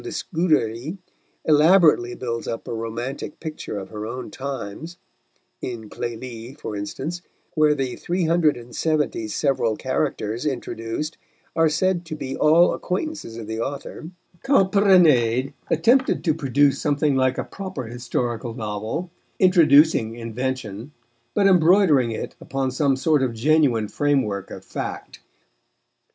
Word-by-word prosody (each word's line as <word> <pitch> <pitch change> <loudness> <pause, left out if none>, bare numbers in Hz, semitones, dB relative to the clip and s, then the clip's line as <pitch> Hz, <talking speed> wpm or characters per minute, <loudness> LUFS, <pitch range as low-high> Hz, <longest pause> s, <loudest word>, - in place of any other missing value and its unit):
de 365 - -5
Scudéry 155 - -1 0.5
elaborately 155 -5 +5
builds 115 -2 -4
up 115 - -5
a - - -4
romantic 115 +6 -5
picture 155 -9 -6
of 95 - -7
her 105 0 -6
own 125 +3 -6
times 140 - -6 0.6
(in 115 -4 -6
Clélie, 120 +2 -6
for 105 - -5
instance, 135 +12 -5 0.3
where 155 -1 +3
the 130 -3 -2
three 180 +1 -2
hundred 160 -4 +3
and 120 0 -11
seventy 150 -8 0
several 115 -2 0
characters 125 -3 -2
introduced 135 +1 -4 0.4
are 165 -1 +4
said 180 +3 +1
to 160 -2 -6
be 135 -3 -5
all 160 +3 +5
acquaintances 185 - -4
of 115 - -6
the 110 +1 -5
author), 140 +5 -5 0.3
Calprenède 180 - +4 0.2
attempted 260 +3 +3
to 160 - +2
produce 140 -2 +2
something 145 -1 +1
like 130 -1 +2
a - - -1
proper 190 -9 -6
historical 120 0 -3
novel, 110 - -4 0.3
introducing 155 - +5
invention, 120 +1 -4 0.4
but 200 - +3
embroidering 175 - +5
it 115 - -5
upon 135 -1 -2
some 140 +1 +2
sort 150 +2 +2
of 125 -3 -1
genuine 125 -3 +2
framework 130 -8 0
of - - -9
fact. - - -6
135 Hz, 130 wpm, -23 LUFS, 115-160 Hz, 0.6 s, elaborately